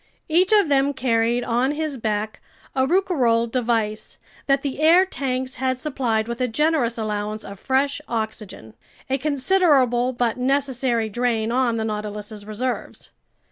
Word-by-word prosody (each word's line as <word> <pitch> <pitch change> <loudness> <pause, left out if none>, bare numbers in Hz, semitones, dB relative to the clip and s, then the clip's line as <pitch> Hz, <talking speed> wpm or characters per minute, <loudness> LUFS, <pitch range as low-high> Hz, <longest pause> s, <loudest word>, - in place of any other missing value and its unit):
Each 355 +5 +3
of 415 -5 +5
them 280 0 +2
carried 235 -1 +1
on 245 +4 +1
his 310 -1 -3
back 215 -2 -3 0.3
a 260 0 +1
Rouquayrol 260 -11 +2
device 225 -4 -1 0.3
that 275 -1 +2
the 275 -1 -3
air 340 +4 +6
tanks 260 -6 -3
had 260 -1 +1
supplied 250 -6 -1
with 235 +1 -4
a 250 - +2
generous 260 -2 +1
allowance 215 -1 -3
of 200 -1 -9
fresh 275 +2 0
oxygen. 220 - -5 0.4
A 270 - +1
considerable 275 -4 +2
but 240 -2 -1
necessary 255 -3 0
drain 230 0 -1
on 245 -2 +1
the 220 - -1
Nautilus's 210 -1 -5
reserves. 240 +4 -4
250 Hz, 140 wpm, -22 LUFS, 225-275 Hz, 0.4 s, air